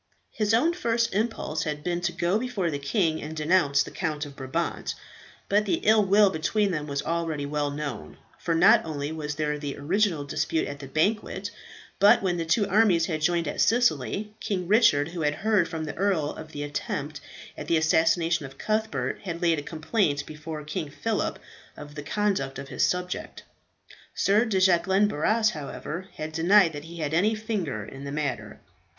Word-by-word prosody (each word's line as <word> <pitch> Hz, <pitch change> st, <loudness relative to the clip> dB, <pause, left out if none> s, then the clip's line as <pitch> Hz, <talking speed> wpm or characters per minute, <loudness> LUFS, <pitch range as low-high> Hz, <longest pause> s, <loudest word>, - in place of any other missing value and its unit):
His 215 Hz, -2 st, 0 dB
own 255 Hz, +10 st, +3 dB
first 230 Hz, -, 0 dB
impulse 205 Hz, -7 st, -1 dB
had 150 Hz, -1 st, -3 dB
been 175 Hz, 0 st, -1 dB
to 175 Hz, 0 st, 0 dB
go 175 Hz, +4 st, 0 dB
before 225 Hz, -9 st, -2 dB
the 145 Hz, -, -3 dB
king 160 Hz, +1 st, 0 dB
and 155 Hz, +1 st, -7 dB
denounce 150 Hz, -3 st, +3 dB
the -, -, -10 dB
Count 155 Hz, -4 st, -3 dB
of 140 Hz, -1 st, -11 dB
Brabant. 135 Hz, +6 st, -3 dB, 0.5 s
But 205 Hz, +1 st, +2 dB
the 195 Hz, -, +2 dB
ill 215 Hz, 0 st, +5 dB
will 200 Hz, +1 st, +5 dB
between 200 Hz, +5 st, 0 dB
them 150 Hz, -3 st, -3 dB
was 140 Hz, -1 st, -2 dB
already 165 Hz, -3 st, -2 dB
well 145 Hz, 0 st, -1 dB
known; 145 Hz, -, -6 dB, 0.2 s
for 170 Hz, -2 st, -1 dB
not 165 Hz, -, +6 dB
only 150 Hz, -2 st, -4 dB
was 150 Hz, -2 st, -4 dB
there 150 Hz, -1 st, -1 dB
the 145 Hz, -1 st, -5 dB
original 170 Hz, +1 st, +1 dB
dispute 155 Hz, +2 st, -1 dB
at 145 Hz, 0 st, -7 dB
the 135 Hz, -, -8 dB
banquet, 200 Hz, +7 st, -1 dB, 0.5 s
but 200 Hz, 0 st, +6 dB
when 180 Hz, -2 st, 0 dB
the 165 Hz, -1 st, -3 dB
two 200 Hz, +5 st, +2 dB
armies 195 Hz, -5 st, +4 dB
had 155 Hz, -3 st, -3 dB
joined 170 Hz, 0 st, +1 dB
at -, -, -1 dB
Sicily, 210 Hz, -, +1 dB
King 185 Hz, -4 st, -2 dB
Richard, 165 Hz, -8 st, +4 dB
who 170 Hz, 0 st, -5 dB
had 150 Hz, -1 st, +1 dB
heard 210 Hz, -5 st, +2 dB
from 165 Hz, -1 st, -4 dB
the 150 Hz, -, -4 dB
earl 180 Hz, -6 st, 0 dB
of 155 Hz, -, -10 dB
the 145 Hz, -2 st, -5 dB
attempt 145 Hz, 0 st, -4 dB, 0.3 s
at -, -, -7 dB
the 165 Hz, -, +3 dB
assassination 165 Hz, +1 st, +2 dB
of 135 Hz, 0 st, -16 dB
Cuthbert, 220 Hz, +1 st, -1 dB
had 170 Hz, -3 st, -4 dB
laid 170 Hz, -3 st, +2 dB
a -, -, -4 dB
complaint 155 Hz, -1 st, -1 dB
before 155 Hz, 0 st, -7 dB
King 150 Hz, 0 st, -4 dB
Phillip 215 Hz, +9 st, -2 dB, 0.4 s
of 145 Hz, 0 st, -10 dB
the 145 Hz, -, -6 dB
conduct 170 Hz, -4 st, -1 dB
of 135 Hz, 0 st, -8 dB
his -, -, -1 dB
subject. 180 Hz, 0 st, -2 dB, 0.7 s
Sir 210 Hz, +4 st, +3 dB
de 205 Hz, -5 st, 0 dB
Jacquelin 190 Hz, +2 st, +4 dB
Barras, 215 Hz, +6 st, +2 dB
however, 155 Hz, +4 st, -6 dB
had 155 Hz, 0 st, -5 dB
denied 170 Hz, +2 st, +4 dB
that 145 Hz, +1 st, -7 dB
he 170 Hz, +1 st, -10 dB
had 150 Hz, 0 st, -2 dB
any 205 Hz, +7 st, +3 dB
finger 195 Hz, -, -3 dB
in 135 Hz, +4 st, -10 dB
the 140 Hz, -, -5 dB
matter. 130 Hz, -8 st, -3 dB
165 Hz, 190 wpm, -26 LUFS, 150-200 Hz, 0.7 s, not